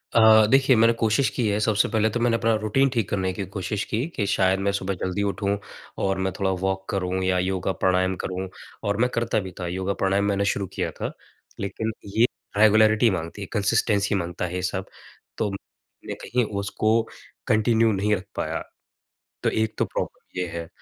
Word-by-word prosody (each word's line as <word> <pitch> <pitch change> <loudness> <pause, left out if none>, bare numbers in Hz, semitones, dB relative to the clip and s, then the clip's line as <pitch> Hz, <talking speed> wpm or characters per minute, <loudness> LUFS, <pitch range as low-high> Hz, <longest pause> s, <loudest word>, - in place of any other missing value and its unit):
अ, 110 -1 +7
देखिए 135 -1 +5
मैंने 115 +1 +5
कोशिश 115 +4 +2
की 120 -4 -1
है, 105 0 +1
सबसे 105 -1 +2
पहले 110 -1 +2
तो 120 - -2
मैंने 120 -1 +2
अपना 115 0 +2
रूटीन 135 +6 +2
ठीक 115 -5 0
करने 95 -2 0
की 100 +1 -4
कोशिश 100 +2 -2
की, 115 +6 -1
कि 120 -11 -3
शायद 95 -1 +2
मैं 100 +1 +1
सुबह 100 -1 -2
जल्दी 95 +2 -1
उठूँ 100 0 0 0.5
और 95 0 +1
मैं 95 0 -1
थोड़ा 95 -1 +1
वॉक 95 0 -1
करूँ 95 -1 -1
या 95 0 +2
योगा 95 +1 -1
प्राणायाम 95 0 +2
करूँ। 95 +1 -3 0.4
और 100 0 0
मैं 125 - +3
करता 115 -1 +1
भी 95 -2 -6
था, 90 - -3
योगा 95 +2 -2
प्राणायाम 95 +1 +1
मैंने 100 0 +1
शुरू 100 -1 0
किया - - -2
था। - - -4 0.5
लेकिन 105 +3 -3 0.3
ये 115 - +6 0.3
रेगुलैरिटी 110 +1 +5
माँगती 85 +3 -4
है, 100 - -5
कंसिस्टेंसी 105 -1 +2
माँगता 85 -1 -2
है 90 +1 -5
ये 90 - -2
सब। 95 +1 -2 0.5
तो 105 - 0
मैंने 95 - -10
कहीं 125 0 +1
उसको 110 +3 +1 0.5
कंटिन्यू 110 +1 +3
नहीं 105 +1 +1
रख 95 - -7
पाया। - - -2 0.8
तो - - +3
एक 110 0 -1
तो - - +2
प्रॉब्लम - - -5
ये 90 - -1
है। 85 -1 -6
100 Hz, 195 wpm, -24 LUFS, 95-110 Hz, 0.8 s, अ